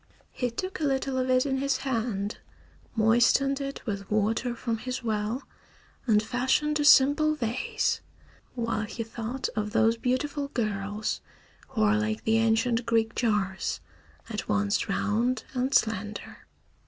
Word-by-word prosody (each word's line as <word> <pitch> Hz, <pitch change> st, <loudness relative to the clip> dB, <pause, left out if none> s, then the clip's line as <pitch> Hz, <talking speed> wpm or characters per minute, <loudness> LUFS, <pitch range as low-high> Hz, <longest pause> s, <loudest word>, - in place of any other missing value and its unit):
He 250 Hz, -, -1 dB
took 370 Hz, +11 st, -5 dB
a -, -, -3 dB
little 270 Hz, -2 st, 0 dB
of 255 Hz, 0 st, -1 dB
it 255 Hz, +1 st, +4 dB
in 265 Hz, -1 st, 0 dB
his 275 Hz, 0 st, +1 dB
hand, 225 Hz, -5 st, -2 dB, 0.6 s
moistened 240 Hz, +5 st, +3 dB
it 275 Hz, 0 st, -5 dB
with 200 Hz, -3 st, -4 dB
water 220 Hz, +3 st, +1 dB
from 230 Hz, -1 st, -2 dB
his 250 Hz, +1 st, -4 dB
well, 220 Hz, +3 st, -1 dB, 0.6 s
and 210 Hz, -2 st, +4 dB
fashioned 260 Hz, +6 st, +1 dB
a -, -, +2 dB
simple 295 Hz, +2 st, +6 dB
vase, 300 Hz, -, -1 dB, 0.5 s
while 230 Hz, -3 st, -1 dB
he 230 Hz, -, -4 dB
thought 230 Hz, +3 st, -4 dB
of 210 Hz, 0 st, -2 dB
those 225 Hz, 0 st, +3 dB
beautiful 280 Hz, +4 st, -1 dB
girls 210 Hz, -4 st, -2 dB, 0.5 s
who 230 Hz, -5 st, -1 dB
are 215 Hz, 0 st, +4 dB
like 215 Hz, 0 st, -2 dB
the 225 Hz, 0 st, +3 dB
ancient 230 Hz, +2 st, +2 dB
Greek 225 Hz, -1 st, +2 dB
jars, 205 Hz, -5 st, 0 dB, 0.5 s
at 215 Hz, -2 st, -5 dB
once 210 Hz, +1 st, +1 dB
round 230 Hz, +6 st, 0 dB
and 255 Hz, +1 st, 0 dB
slender. 215 Hz, -1 st, -1 dB
230 Hz, 140 wpm, -27 LUFS, 215-260 Hz, 0.6 s, simple